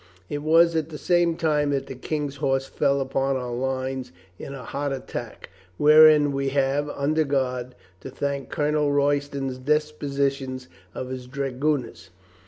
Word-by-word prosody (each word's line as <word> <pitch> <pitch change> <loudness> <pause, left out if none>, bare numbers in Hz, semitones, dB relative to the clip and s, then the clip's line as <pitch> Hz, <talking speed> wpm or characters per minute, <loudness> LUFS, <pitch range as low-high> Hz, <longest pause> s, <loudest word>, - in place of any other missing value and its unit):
It 145 - -3
was 165 +2 +4
at 160 -1 -1
the 155 - -7
same 175 -1 +2
time 150 -3 +1
that 140 -1 -1
the - - -7
King's 145 +2 -4
horse 135 -1 0
fell 140 0 +1
upon 135 0 0
our 125 -1 -4
lines 130 0 -3 0.3
in 140 - -7
a 130 - -8
hot 140 +4 -3
.attack, 135 -1 -6 0.3
wherein 150 -1 +7
we 135 0 -1
have, 140 +1 0
under 150 +3 0
God, 130 -3 -2 0.2
to - - -8
thank 140 +1 -3
Colonel 150 0 +1
Royston's 140 -2 0
dispositions 140 -2 -1 0.3
of 130 - -5
his 130 -1 -6
dragoon 140 +1 -1
ers. 85 -6 -14
140 Hz, 155 wpm, -24 LUFS, 130-150 Hz, 0.3 s, wherein